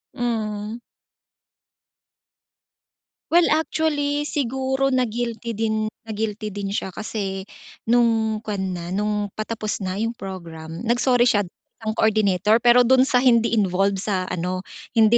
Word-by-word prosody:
Mm. 220 Hz, -2 st, -2 dB, 2.5 s
Well, 345 Hz, 0 st, +5 dB
actually, 295 Hz, -2 st, +1 dB
siguro 265 Hz, 0 st, 0 dB
na-guilty 235 Hz, -2 st, -2 dB
din 215 Hz, -1 st, 0 dB, 0.2 s
na-guilty 215 Hz, -1 st, -3 dB
din 200 Hz, -1 st, -4 dB
siya 190 Hz, -2 st, -3 dB
kasi 195 Hz, -3 st, -4 dB, 0.5 s
no'ng 225 Hz, -2 st, +3 dB
kuwan 205 Hz, -3 st, -2 dB, 0.2 s
na 170 Hz, -, -6 dB
no'ng 210 Hz, 0 st, -1 dB
patapos 215 Hz, -1 st, -3 dB
na 185 Hz, 0 st, -3 dB
yung 225 Hz, +2 st, -1 dB
program, 170 Hz, -2 st, -8 dB
nag-sorry 245 Hz, +1 st, +3 dB
siya 210 Hz, -4 st, +4 dB
isang 220 Hz, +3 st, -8 dB
coordinator. 215 Hz, 0 st, +3 dB
Pero 245 Hz, +1 st, +6 dB
doon 260 Hz, +1 st, +5 dB
sa 260 Hz, -1 st, +3 dB
hindi 235 Hz, -2 st, +4 dB
involved 195 Hz, 0 st, +2 dB
sa 190 Hz, -2 st, -2 dB
ano, 180 Hz, +1 st, -2 dB, 0.3 s
hindi 225 Hz, 0 st, +5 dB
220 Hz, 120 wpm, -23 LUFS, 200-240 Hz, 2.5 s, Pero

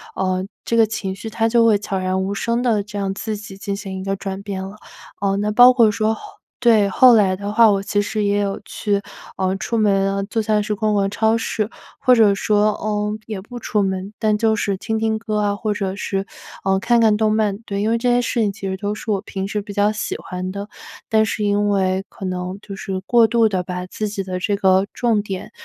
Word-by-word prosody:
呃， 185 Hz, 0 st, -1 dB, 0.2 s
这 230 Hz, -, 0 dB
个 225 Hz, -1 st, +5 dB
情 195 Hz, -3 st, -3 dB
绪 210 Hz, +4 st, -7 dB
它 225 Hz, +1 st, 0 dB
就 235 Hz, 0 st, +4 dB
会 220 Hz, -2 st, +5 dB
悄 195 Hz, -2 st, -3 dB
然 185 Hz, 0 st, -1 dB
无 195 Hz, +1 st, -2 dB
声 235 Hz, +4 st, -1 dB
地 225 Hz, -5 st, +2 dB
这 205 Hz, 0 st, -8 dB
样 195 Hz, -1 st, -1 dB
自 215 Hz, +2 st, -4 dB
己 205 Hz, -2 st, -9 dB
进 200 Hz, 0 st, -4 dB
行 195 Hz, -2 st, -6 dB
一 -, -, -6 dB
个 195 Hz, -, -1 dB
转 195 Hz, 0 st, -5 dB
变 200 Hz, -2 st, -5 dB
了。 195 Hz, +2 st, -8 dB, 0.4 s
呃， 195 Hz, -1 st, +1 dB
那 210 Hz, +1 st, 0 dB
包 245 Hz, +4 st, +8 dB
括 235 Hz, -3 st, +5 dB
说 220 Hz, 0 st, 0 dB, 0.4 s
对， 225 Hz, -5 st, +4 dB
后 250 Hz, +4 st, +6 dB
来 195 Hz, -4 st, +3 dB
的 200 Hz, +2 st, -5 dB
话 225 Hz, 0 st, +6 dB
我 195 Hz, -1 st, +1 dB
其 205 Hz, 0 st, 0 dB
实 215 Hz, +1 st, -2 dB
也 205 Hz, 0 st, +1 dB
有 200 Hz, -1 st, -2 dB
去， 205 Hz, -2 st, -1 dB, 0.3 s
呃， 190 Hz, 0 st, 0 dB
出 230 Hz, +3 st, -2 dB
门 195 Hz, -2 st, +2 dB
啊， 195 Hz, -, -1 dB
做 225 Hz, 0 st, -1 dB
菜 210 Hz, -1 st, +2 dB
时 210 Hz, 0 st, -2 dB
逛 215 Hz, +1 st, 0 dB
逛 195 Hz, -1 st, +1 dB
超 220 Hz, +2 st, +2 dB
市， 220 Hz, -2 st, -1 dB, 0.3 s
或 255 Hz, -, +4 dB
者 215 Hz, -4 st, +5 dB
说， 210 Hz, +1 st, +2 dB
嗯， 210 Hz, 0 st, -1 dB
也 210 Hz, -4 st, -5 dB
不 240 Hz, +5 st, -10 dB
出 210 Hz, -3 st, -1 dB
门， 190 Hz, +1 st, -2 dB
但 215 Hz, -2 st, +2 dB
就 220 Hz, 0 st, +2 dB
是 200 Hz, -2 st, -1 dB
听 220 Hz, +3 st, -2 dB
听 220 Hz, 0 st, 0 dB
歌 215 Hz, -1 st, -2 dB
啊， 205 Hz, -1 st, +1 dB
或 210 Hz, 0 st, -2 dB
者 195 Hz, -2 st, -3 dB
是， 195 Hz, -1 st, -3 dB, 0.4 s
呃， 190 Hz, 0 st, +2 dB
看 235 Hz, +4 st, +2 dB
看 215 Hz, -2 st, +4 dB
动 215 Hz, -1 st, +2 dB
漫， 210 Hz, -2 st, +1 dB
对， 200 Hz, 0 st, -3 dB
因 215 Hz, -, +1 dB
为 230 Hz, -, +2 dB
这 245 Hz, +1 st, +1 dB
些 245 Hz, -, +3 dB
事 235 Hz, 0 st, -1 dB
情 205 Hz, -2 st, +1 dB
其 195 Hz, -1 st, -6 dB
实 190 Hz, -, -3 dB
就 205 Hz, +1 st, -2 dB
是 220 Hz, -, -8 dB
我 205 Hz, -2 st, +1 dB
平 195 Hz, -2 st, -4 dB
时 210 Hz, +1 st, -2 dB
比 205 Hz, 0 st, -7 dB
较 205 Hz, +1 st, +2 dB
喜 215 Hz, 0 st, -3 dB
欢 185 Hz, 0 st, -5 dB
的， 200 Hz, +2 st, -6 dB, 0.4 s
但 220 Hz, 0 st, +3 dB
是 215 Hz, -1 st, -2 dB
因 205 Hz, 0 st, +1 dB
为 190 Hz, -1 st, +1 dB
可 195 Hz, -, -8 dB
能 185 Hz, +1 st, -4 dB
就 200 Hz, -, -8 dB
是 190 Hz, -1 st, -4 dB
过 235 Hz, -2 st, +5 dB
度 225 Hz, -1 st, +3 dB
地 185 Hz, -2 st, -1 dB
把 180 Hz, 0 st, -5 dB
自 215 Hz, +3 st, -4 dB
己 205 Hz, -1 st, -4 dB
的 185 Hz, -1 st, -4 dB
这 200 Hz, +2 st, 0 dB
个 190 Hz, -1 st, +3 dB
重 225 Hz, -4 st, +1 dB
点， 195 Hz, -3 st, -6 dB
205 Hz, 260 characters per minute, -20 LUFS, 195-220 Hz, 0.4 s, 包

